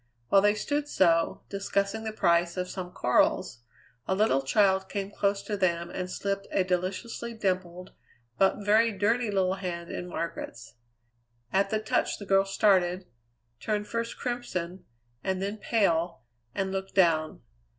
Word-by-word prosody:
While 195 Hz, -, +6 dB
they 205 Hz, +1 st, +4 dB
stood 290 Hz, +6 st, -1 dB
so, 165 Hz, -, +2 dB
discussing 200 Hz, +2 st, -1 dB
the 220 Hz, -, -2 dB
price 170 Hz, -4 st, +2 dB
of 180 Hz, 0 st, -1 dB
some 180 Hz, -1 st, -6 dB
corals, 125 Hz, -4 st, +1 dB, 0.5 s
a 190 Hz, -, +1 dB
little 195 Hz, -10 st, +3 dB
child 190 Hz, +6 st, +2 dB
came 200 Hz, -1 st, -3 dB
close 200 Hz, -1 st, 0 dB
to 210 Hz, -, -3 dB
them 170 Hz, -3 st, 0 dB
and 180 Hz, -1 st, -4 dB
slipped 195 Hz, +1 st, -3 dB
a 190 Hz, -, +2 dB
deliciously 185 Hz, +6 st, -3 dB
dimpled, 185 Hz, -3 st, -2 dB, 0.5 s
but 195 Hz, +1 st, +2 dB
very 220 Hz, +2 st, +4 dB
dirty 215 Hz, +4 st, +1 dB
little 190 Hz, -2 st, +1 dB
hand 175 Hz, -3 st, -5 dB
in 180 Hz, -, -5 dB
Margaret's. 165 Hz, -11 st, -5 dB, 0.8 s
At 195 Hz, +1 st, +3 dB
the 215 Hz, -, 0 dB
touch 215 Hz, -, 0 dB
the 205 Hz, -, -8 dB
girl 195 Hz, 0 st, +4 dB
started, 190 Hz, -2 st, +2 dB, 0.5 s
turned 210 Hz, -1 st, -1 dB
first 230 Hz, +2 st, -3 dB
crimson 190 Hz, -8 st, -4 dB, 0.4 s
and 190 Hz, -1 st, -1 dB
then 200 Hz, +3 st, -3 dB
pale, 175 Hz, -, +1 dB, 0.3 s
and 190 Hz, -1 st, -1 dB
looked 195 Hz, 0 st, -4 dB
down. 160 Hz, -, +2 dB
195 Hz, 150 wpm, -28 LUFS, 180-205 Hz, 0.8 s, While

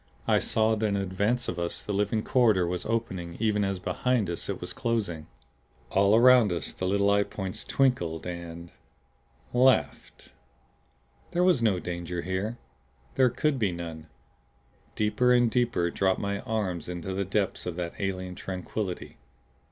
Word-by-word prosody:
I -, -, +4 dB
saw 110 Hz, 0 st, +2 dB
that 110 Hz, 0 st, 0 dB
in 100 Hz, -, 0 dB
advance 100 Hz, +5 st, 0 dB
of 90 Hz, -, -3 dB
us 85 Hz, 0 st, -3 dB
the 105 Hz, -, -3 dB
living 105 Hz, +2 st, 0 dB
corridor 110 Hz, -8 st, +3 dB
was 90 Hz, 0 st, -3 dB
opening 95 Hz, -7 st, -3 dB
even 105 Hz, -2 st, +1 dB
as 95 Hz, -1 st, -1 dB
behind 110 Hz, +2 st, 0 dB
us 85 Hz, -, -4 dB
it -, -, -3 dB
was -, -, -5 dB
closing. 100 Hz, -10 st, -2 dB, 0.6 s
All 100 Hz, +2 st, +4 dB
around 120 Hz, -3 st, +6 dB
us 85 Hz, -4 st, -3 dB
the 90 Hz, -, -3 dB
little 100 Hz, +1 st, +2 dB
eye 100 Hz, 0 st, +4 dB
points 95 Hz, -2 st, -4 dB
twinkled 90 Hz, -12 st, 0 dB
and 85 Hz, -1 st, -7 dB, 0.8 s
laughed. 130 Hz, +1 st, +2 dB, 1.0 s
There 175 Hz, -, +2 dB
was 180 Hz, -9 st, +4 dB
no 110 Hz, -5 st, +3 dB
danger 85 Hz, 0 st, -4 dB
here 95 Hz, +6 st, -2 dB, 0.6 s
there 130 Hz, -1 st, +4 dB
could 150 Hz, +2 st, 0 dB
be 105 Hz, -5 st, +1 dB
none. 85 Hz, -2 st, -7 dB, 0.9 s
Deeper 125 Hz, +4 st, +2 dB
and 120 Hz, -2 st, +4 dB
deeper 120 Hz, -9 st, +1 dB
dropped 95 Hz, -1 st, +1 dB
my 100 Hz, 0 st, -2 dB
mind 95 Hz, -7 st, -2 dB
into 90 Hz, +2 st, -4 dB
the 100 Hz, +1 st, -1 dB
depths 95 Hz, 0 st, -1 dB
of 90 Hz, -, -3 dB
that 85 Hz, -1 st, -4 dB
alien 95 Hz, -2 st, -3 dB
tranquillity. 95 Hz, +1 st, -5 dB
100 Hz, 155 wpm, -27 LUFS, 90-115 Hz, 1.0 s, around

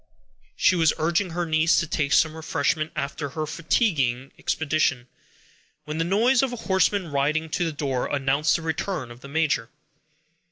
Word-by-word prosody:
She 185 Hz, -, +3 dB
was 165 Hz, -3 st, +3 dB
urging 170 Hz, +4 st, +1 dB
her 175 Hz, +1 st, -2 dB
niece 160 Hz, +1 st, +3 dB
to 170 Hz, -, -1 dB
take 150 Hz, -2 st, -1 dB
some 155 Hz, +1 st, +3 dB
refreshment 155 Hz, 0 st, -1 dB
after 140 Hz, +1 st, -3 dB
her 155 Hz, +3 st, -3 dB
fatiguing 150 Hz, -, 0 dB
expedition, 145 Hz, -5 st, 0 dB, 0.8 s
when 150 Hz, +1 st, -4 dB
the -, -, +2 dB
noise 230 Hz, +9 st, +3 dB
of 265 Hz, -2 st, 0 dB
a -, -, -4 dB
horseman 190 Hz, -2 st, +1 dB
riding 155 Hz, +3 st, 0 dB
to 175 Hz, -, 0 dB
the 165 Hz, -, -1 dB
door, 140 Hz, -4 st, -2 dB
announced 140 Hz, +2 st, +1 dB
the 165 Hz, -, -3 dB
return 160 Hz, -4 st, -3 dB
of 120 Hz, -, -12 dB
the 140 Hz, -, -11 dB
major. 145 Hz, -6 st, 0 dB
155 Hz, 165 wpm, -24 LUFS, 140-170 Hz, 0.8 s, She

